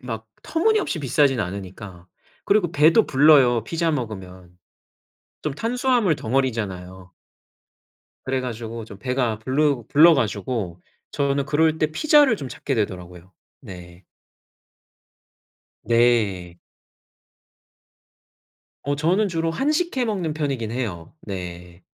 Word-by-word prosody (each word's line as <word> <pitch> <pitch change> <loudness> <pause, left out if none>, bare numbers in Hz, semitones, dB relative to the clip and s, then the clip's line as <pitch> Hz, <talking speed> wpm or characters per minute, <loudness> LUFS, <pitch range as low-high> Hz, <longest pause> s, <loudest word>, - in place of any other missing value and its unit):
막 115 -3 -7 0.2
터무니없이 410 - 0
비싸진 135 -2 +2
않으니까. 95 -1 -7 0.4
그리고 200 -5 +2
배도 160 +9 +5
불러요, 135 -5 +5
피자 165 +5 -1
먹으면. 95 -8 -6 0.9
좀 150 -3 -3
탄수화물 240 - +1
덩어리잖아요. 95 -8 -3 1.1
그래가지고 120 -3 -4
좀 100 -3 -12
배가 125 -3 -1
불르 135 +2 0
불러 165 +3 +7
가지고 105 - -3 0.3
저는 140 -1 0
그럴 160 +1 +2
때 155 - +2
피자를 290 - +4
좀 135 -6 -7
찾게 135 - -4
되더라고요. 90 -4 -5 0.3
네. 90 -1 -12 1.8
네. 110 -7 +1 2.3
어 145 0 0
저는 185 +7 +1
주로 165 -1 -1
한식 300 - -1
해 250 - +1
먹는 185 -8 -2
편이긴 135 -8 -3
해요. 100 -10 -5
네. 90 -2 -8
125 Hz, 235 characters per minute, -22 LUFS, 100-160 Hz, 2.3 s, 불러